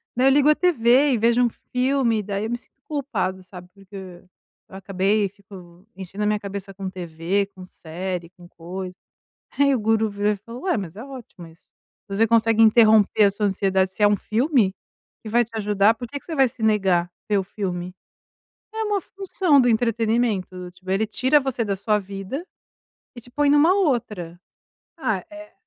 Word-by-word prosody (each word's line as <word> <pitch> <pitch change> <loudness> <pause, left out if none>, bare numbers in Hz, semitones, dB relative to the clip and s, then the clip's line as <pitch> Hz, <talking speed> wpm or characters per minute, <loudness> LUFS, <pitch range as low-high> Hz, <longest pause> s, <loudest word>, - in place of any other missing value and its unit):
daí 255 +2 +3
eu - - +6
ligo 290 +2 +4
a 305 - +5
tv 275 -5 +3
e - - +2
vejo 235 +2 +3
um 245 - +3
filme 250 -1 0
e 210 - -4
daí 200 +1 -3
eu - - -4
me 240 - -2
sinto 270 - -18
culpado, 225 -11 -3
sabe, 180 -1 -12
porque 190 -2 -11 0.5
acabei 195 +2 0
e 195 - -3
fico 190 -2 -15
enchendo 195 +2 -6
a - - +2
minha 210 0 +1
cabeça 200 -1 -7
com 190 0 -5
tv, 180 +2 -2
com 185 - -10
série, 175 0 -6
com 175 -1 -16
coisa". 180 +2 -7 0.6
Aí 280 -1 +4
o 250 - +1
guru 220 0 +1
virou 205 +1 0
e - - -4
falo: 230 +5 -11
"Ué, 365 -5 0
mas 190 -4 -6
é 225 - -8
ótimo 250 -10 -11
isso". 165 0 -20 0.4
Você 200 +3 +2
consegue 225 0 +3
interromper 220 -2 +5
a 200 - +5
sua 205 +1 0
ansiedade, 190 -1 +1
se 200 - -9
é 205 - +7
um 205 - +3
filme 225 - +1 0.5
que - - -10
vai 240 +2 +3
te 230 - -15
ajudar 210 +1 +3
por 240 +1 -8
que 285 - -6
que - - -23
você 325 - -5
vai 270 -2 +4
se 230 -1 -9
negar 190 -5 +2 0.2
ver 205 - +3
o 190 - 0
filme? 180 -2 -5 0.8
É 445 - -2
uma 410 -2 0
função 375 -6 +1
do 245 - +4
entretenimento, 220 -5 0
tipo, 185 +1 -14
ele 195 +3 +1
tira 260 +7 +2
você 255 -4 -2
da 200 - -1
sua 210 +2 0
vida 200 - -6 0.7
e - - -8
te 245 +2 -16
põe 290 +2 +1
numa 295 +5 +5
outra. 225 - -1 0.6
Ah, 220 - -1
eh, 310 0 -12
210 Hz, 195 wpm, -23 LUFS, 190-245 Hz, 0.8 s, é